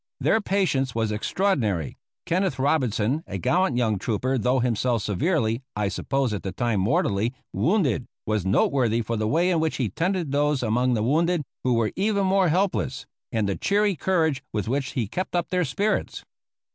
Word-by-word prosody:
Their 220 - +2
patience 150 - 0
was 110 -2 0
extraordinary. 105 - 0 0.3
Kenneth 180 -5 0
Robinson, 130 -1 +1
a 95 - -4
gallant 170 - +1
young 110 -5 +1
trooper, 125 +5 -1
though 125 +3 +2
himself 120 -2 0
severely 115 - 0
(I 105 -1 0
supposed 135 +2 -1
at 100 - -3
the 95 - -4
time 110 +2 0
mortally) 105 +3 +1 0.2
wounded, 155 - +1 0.2
was 110 -3 0
noteworthy 115 +3 +2
for 115 - -2
the 110 -1 -1
way 170 +9 +2
in 170 - +2
which 160 0 0
he 125 -6 -1
tended 175 - -1
those 145 -1 +1
among 120 +3 +1
the 110 - 0
wounded 165 +6 +2 0.2
who 125 -2 +2
were 115 -2 +1
even 200 0 +1
more 190 -1 +3
helpless, 155 -7 0 0.3
and 110 -3 0
the 100 - -1
cheery 205 -1 +1
courage 160 -4 +1
with 105 -1 -2
which 135 +2 -1
he 120 -7 -1
kept 180 - -4
up 175 -1 0
their 180 0 +1
spirits. 200 +9 -1
130 Hz, 175 wpm, -25 LUFS, 110-170 Hz, 0.3 s, more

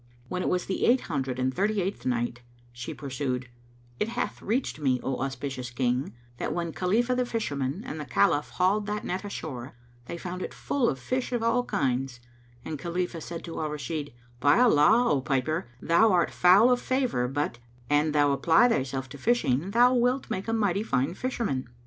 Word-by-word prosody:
When 180 - -2
it - - 0
was 180 0 0
the 190 - -1
Eight 250 +2 +4
Hundred 135 -5 -3
and 130 0 0
Thirty 205 +6 +1
eighth 195 -4 -3
Night, 120 0 -1 0.3
She 120 0 -6
pursued, 130 -2 -3 0.5
It - - +1
hath 240 +2 -3
reached 230 - -1
me, 130 -4 +1
O 135 -1 -2
auspicious 135 -1 -4
King, 125 0 -1 0.2
that - - -2
when 170 -2 -2
Khalifah 225 +7 +1
the 250 - +1
Fisherman 160 - -2
and 155 - -5
the 150 - -5
Caliph 145 +1 +2
hauled 200 +3 +1
that 210 0 -2
net 185 +2 -3
ashore, 140 -11 -6 0.3
they 170 - -5
found 180 +1 -6
it - - -5
full 270 -4 0
of 135 - -2
fish 255 - -2
of 240 -2 -1
all 230 +2 +2
kinds; 135 - -1 0.5
and 155 -3 -5
Khalifah 170 +1 -3
said 170 +1 -6
to 165 - -6
Al 155 - -1
Rashid, 150 0 -4 0.3
"By 145 +3 +4
Allah, 225 +1 +5
O 140 - +2
piper, 135 +3 -1
thou 170 - +4
art 175 -2 +2
foul 195 +7 +6
of 245 0 +2
favor 255 - 0
but, 135 -2 -2 0.3
an 150 +2 +2
thou 145 -1 +3
apply 165 - +4
thyself 130 - -1
to 140 - -10
fishing, 165 - +1
thou 240 +4 +5
wilt 250 +2 +1
make 190 - -3
a 225 - 0
mighty 205 -3 +1
fine 135 - 0
fisherman. 195 - -2
165 Hz, 190 wpm, -27 LUFS, 135-215 Hz, 0.5 s, foul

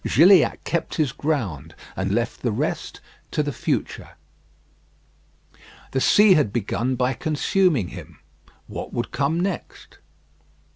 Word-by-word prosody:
Gilliatt 175 - +5
kept 170 - -2
his 150 -6 +1
ground, 95 - -3 0.2
and 95 +1 -2
left 115 +3 -1
the 120 - 0
rest 105 - -3 0.3
to - - 0
the - - -2
future. - - -3 1.8
The 130 - 0
sea 205 +5 +6
had 145 - +2
begun 120 +3 -1
by 125 +1 0
consuming 155 - +1
him; 85 -3 -11 0.5
what - - -7
would 120 - -3
come 145 +4 0
next? 185 -1 -5
130 Hz, 125 wpm, -23 LUFS, 105-160 Hz, 1.8 s, sea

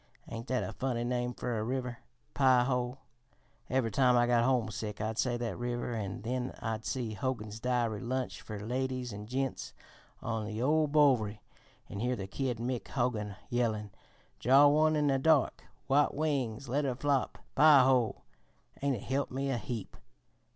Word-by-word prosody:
Ain't 115 +2 -7
that 130 -1 0
a - - -5
funny 125 -3 -2
name 125 0 -1
fer 120 -3 -2
a - - -1
river? 125 0 -3 0.3
Pie 130 -3 +5
ho? 125 0 -1 0.7
Every 130 -4 +1
time 125 +3 +4
I 120 - +4
got 120 -1 +3
homesick 110 -4 -1
I'd 110 +1 -2
say 120 -2 +1
that 120 -3 -4
river, 120 0 -2
an' 100 -3 -4
then 125 +2 -3
I'd 110 -1 -3
see 120 -4 -2
Hogan's 110 -1 -3
Dairy 120 -3 0
Lunch 130 +1 -3
fer 110 - -7
Ladies 125 +2 -2
an' 105 +1 -7
Gents 135 +2 -3 0.5
on 110 -2 -3
the 110 0 -4
ol' 155 +5 +3
Bowery 130 -8 +3 0.4
an' 100 - -7
hear 125 +3 0
the 100 -5 -5
kid 125 +4 -2
Mick 120 +1 -3
Hogan 115 -6 -1 0.2
yellin': 110 -4 0 0.5
'Draw 135 +4 +6
one 155 +2 +4
in 150 -1 +2
the 135 -2 +2
dark! 135 - +2 0.2
White 145 +2 +3
wings 140 -5 -1
let 140 +5 0
her 130 -3 -1
flop! 140 0 0 0.2
Pie 145 -2 +7
ho!' 125 -3 +2 0.5
an' 140 -1 0
it 105 - -7
helped 140 +1 -1
me 135 +1 -1
a 120 - -1
heap." 115 -2 -6
125 Hz, 170 wpm, -31 LUFS, 115-135 Hz, 0.7 s, Pie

